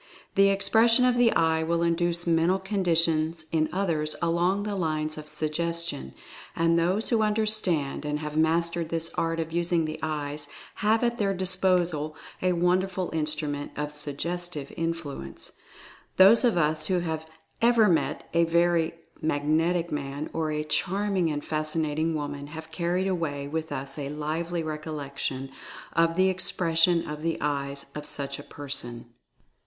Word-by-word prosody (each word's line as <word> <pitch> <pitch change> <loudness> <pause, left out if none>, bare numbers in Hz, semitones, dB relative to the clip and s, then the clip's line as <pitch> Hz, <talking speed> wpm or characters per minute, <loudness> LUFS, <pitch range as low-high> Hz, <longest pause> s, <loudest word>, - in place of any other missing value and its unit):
The 195 0 +5
expression 225 +5 +4
of 250 -1 +3
the 245 -2 +4
eye 160 0 +2
will 170 +1 0
induce 170 0 +1
mental 170 +2 +3
conditions 165 -5 +1
in 155 -1 +1
others 165 -5 0
along 175 +4 +1
the 210 -1 -3
lines 155 -3 -1
of 155 -1 -9
Suggestion, 160 - -2 0.4
and 165 0 +3
those 185 +6 +1
who 230 -3 +2
understand 210 -10 +3
and 150 0 -1
have 150 0 -6
mastered 165 +1 +1
this 165 0 +1
art 165 0 -1
of 160 0 -3
using 170 -1 +1
the 155 0 -5
eyes 150 -1 -3 0.3
have 220 +2 +2
.at 235 0 0
their 195 -2 +1
disposal 180 -4 +1 0.3
a 185 0 +2
wonderful 180 +1 0
instrument 150 -2 -2
of 150 0 -3
Suggestive 150 +2 -4
Influ 165 - -4
ence. 65 - -10 0.7
Those 195 +6 +7
of 235 -7 +3
us 155 -1 +1
who 185 -2 +1
have 160 -2 -4 0.3
ever 230 -2 +5
met 150 -5 0
a 170 0 +4
very 170 0 +2 0.3
"mag 145 -2 -1
netic" 165 +3 +1
man, 145 +1 -4
or 160 -1 -1
a 150 0 -1
"charming 190 +3 0
and 145 -1 -3
fascinating" 155 +1 -1
woman, 145 -1 -4
have 160 +1 -9
carried 175 +3 -1
away 155 -7 -2
with 160 +2 -4
us 135 +2 -5
a 140 -1 -4
lively 160 +3 -3
recollection 140 -4 -4 0.4
of 165 0 +2
"the 190 +1 +4
expression 170 -2 +2
of 150 0 -6
the 165 0 -1
eyes" 140 -1 -2
of 150 0 -7
such 140 -1 -4
a - - -8
person. 120 -5 -6
165 Hz, 155 wpm, -27 LUFS, 150-180 Hz, 0.7 s, Those